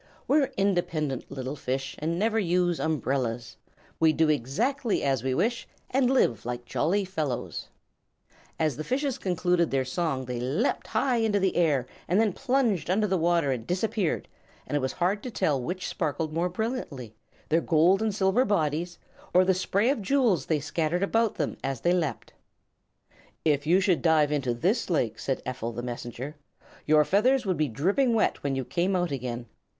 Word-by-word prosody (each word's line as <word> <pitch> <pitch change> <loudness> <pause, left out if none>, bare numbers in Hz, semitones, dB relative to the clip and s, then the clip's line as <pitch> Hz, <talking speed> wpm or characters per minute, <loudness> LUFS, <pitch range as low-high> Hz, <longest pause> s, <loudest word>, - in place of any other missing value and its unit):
"We're 285 -1 +3
independent 175 -8 0
little 135 0 -5
fish 135 0 -3
And 165 +3 -1
never 220 +3 +1
use 175 -2 +1
umbrellas. 130 -6 -2 0.4
We 160 -1 +4
do 160 0 +2
exactly 210 - 0
as 135 -4 +1
we 130 -1 0
wish 235 - 0 0.2
And 255 -1 +3
live 255 - +2
like 120 0 -5
jolly 195 +10 0
fellows." 155 -9 -3 0.9
As 155 -5 0
the 155 - -3
fishes 270 - -1
concluded 180 -2 +1
their 135 -1 0
song 135 -1 -2
they 125 -1 -4
leaped 140 - -1
high 260 -3 +1
into 220 -3 +2
the 190 -1 +1
air 150 -7 +2 0.2
and 180 +4 +2
then 220 -4 +2
plunged 250 - 0
under 205 +4 +2
the 190 -3 0
water 170 -4 +2
and 120 -3 -4
disappeared, 190 0 -1 0.4
and - - -3
it - - +3
was 130 -1 -2
hard 185 +4 0
to 250 - -5
tell 155 - 0
which 180 +8 -4
sparkled 155 +1 -2
most 175 +2 -1
brilliantly, 180 - -4 0.4
their 165 +2 +3
gold 170 +6 +3
and 220 -3 0
silver 195 +5 +3
bodies 175 - 0 0.4
or 185 +1 +6
the 190 - +4
spray 200 +6 +1
of 275 - -2
jewels 220 - +2
they 155 -2 +1
scattered 160 +5 -1
about 225 +2 +1
them 150 - -2
as 135 -3 -3
they 175 - +3
leaped. 160 -9 -2 1.1
"If 145 -1 +2
you 180 +4 +5
should 190 -4 +2
dive 155 -3 +3
into 135 -5 0
this 190 - 0
lake," 125 -10 0
said 135 - -2
Ephel 125 -2 -4
the 120 - -4
Messenger, 125 +4 -6 0.5
"your 150 0 +5
feathers 245 - +3
would 185 -3 0
be 155 - +1
dripping 200 - +1
wet 220 - +1
when 140 -1 -1
you 130 -1 -2
came 180 +6 0
out 175 -3 0
again. 125 -3 -4
170 Hz, 175 wpm, -27 LUFS, 140-200 Hz, 1.1 s, or